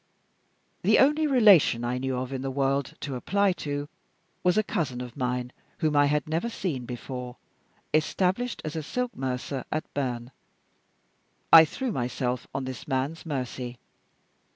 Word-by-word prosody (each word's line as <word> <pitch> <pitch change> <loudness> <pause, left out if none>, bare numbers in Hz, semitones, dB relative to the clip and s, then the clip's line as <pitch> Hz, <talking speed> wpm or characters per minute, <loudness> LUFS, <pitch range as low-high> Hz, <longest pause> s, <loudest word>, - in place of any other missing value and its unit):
The - - +4
only 300 +3 +4
relation 205 - +6
I 125 +1 -1
knew 130 -1 -2
of 130 +1 -4
in 130 - -3
the 135 - -2
world 135 +1 0
to 140 -3 -4
apply 200 +9 +2
to 145 0 -3 0.6
was 180 +2 +3
a 215 - +4
cousin 145 -10 -2
of 125 -1 -7
mine 125 -1 -2 0.3
(whom 155 -1 0
I 145 0 +5
had 150 -1 0
never 165 +9 -1
seen 160 - -3
before), 125 0 -6 0.6
established 185 +9 +1
as 155 +1 -4
a 160 - -1
silk 250 +11 -3
mercer 130 +1 -3
at 155 - -1
Berne. 125 -3 -3 1.2
I 165 -1 +11
threw 255 - -3
myself 125 - -2
on 135 0 -3
this 130 -2 -6
man's 135 +6 -2
mercy. 125 -3 -4
140 Hz, 155 wpm, -27 LUFS, 125-165 Hz, 1.2 s, I